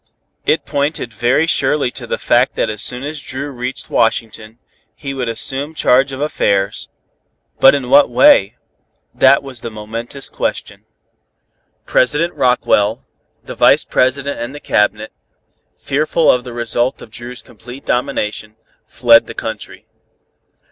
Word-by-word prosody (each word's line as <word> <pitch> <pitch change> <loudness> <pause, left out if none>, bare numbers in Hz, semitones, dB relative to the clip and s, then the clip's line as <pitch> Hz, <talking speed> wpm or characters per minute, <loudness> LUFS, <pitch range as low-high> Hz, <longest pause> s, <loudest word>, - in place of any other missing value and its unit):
It - - +1
pointed 140 -4 -2
very 120 +8 +1
surely 140 -4 +1
to - - -8
the - - -2
fact - - +2
that - - -1
as 105 0 -6
soon 125 +1 -3
as 150 +1 -5
Dru 140 +2 -5
reached 125 0 -6
Washington, 115 -1 -1 0.4
he 135 -1 -6
would 130 -3 -3
assume 135 +6 -1
charge 135 -1 +3
of 135 - -6
affairs. 100 -9 -1 0.7
But 135 - +7
in 135 -3 -3
what 145 +1 +6
way? 115 -4 +4 0.6
That 135 +1 +4
was 130 -4 -8
the 115 - -5
momentous 115 +5 -6
question. - - -4 1.0
President 150 +7 +1
Rockwell, 125 -5 +1 0.4
the - - -8
Vice - - +4
President 140 +2 0
and 120 +4 -6
the - - -8
Cabinet, 105 -3 0 0.7
fearful 155 +3 +1
of 125 - 0
the 125 - -8
result 120 +2 -1
of 110 - -14
Dru's 120 +2 -8
complete 125 +2 -13
domination, 110 -4 -2 0.3
fled - - +4
the - - -9
country. - - -7
125 Hz, 140 wpm, -16 LUFS, 115-140 Hz, 1.0 s, But